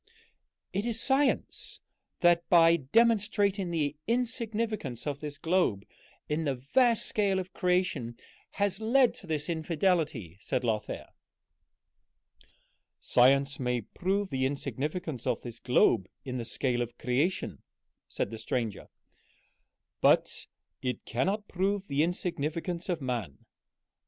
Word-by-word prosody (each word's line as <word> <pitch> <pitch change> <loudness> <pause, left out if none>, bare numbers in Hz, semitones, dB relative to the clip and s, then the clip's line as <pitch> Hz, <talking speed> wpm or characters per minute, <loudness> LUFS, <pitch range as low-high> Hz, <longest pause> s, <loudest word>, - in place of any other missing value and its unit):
"It 205 +4 -1
is 230 -1 -1
science 270 +2 +1 0.4
that, 175 -1 +4
by 165 -1 +7
demonstrating 205 - +2
the 150 -4 -1
insignificance 225 - -2
of 145 -2 -2
this 150 -1 -6
globe 160 - +1 0.4
in 150 +2 -1
the 140 -3 0
vast 230 - +2
scale 200 -3 +1
of 185 -1 -4
creation, 180 -10 0 0.4
has 200 0 0
led 245 +3 +4
to 185 - -12
this 150 -2 -2
infidelity," 160 - 0
said 125 - -1
Lothair. 110 -3 -2 1.9
"Science 135 +2 +3
may 125 -2 0
prove 195 - -2
the 130 -1 0
insignificance 145 0 -4
of 125 -3 0
this 120 -1 -7
globe 120 -6 +3 0.2
in 130 -1 -3
the 115 - -4
scale 120 0 -1
of 120 0 -4
creation," 140 +9 -1 0.5
said - - -3
the 115 - -6
stranger, 115 -5 -3 1.1
"but - - +3 0.3
it 125 -1 -3
cannot 195 - -1
prove 195 +2 -1
the 140 -2 0
insignificance 170 +1 -2
of 170 -4 -1
man. 120 - -4
160 Hz, 120 wpm, -29 LUFS, 130-195 Hz, 1.9 s, by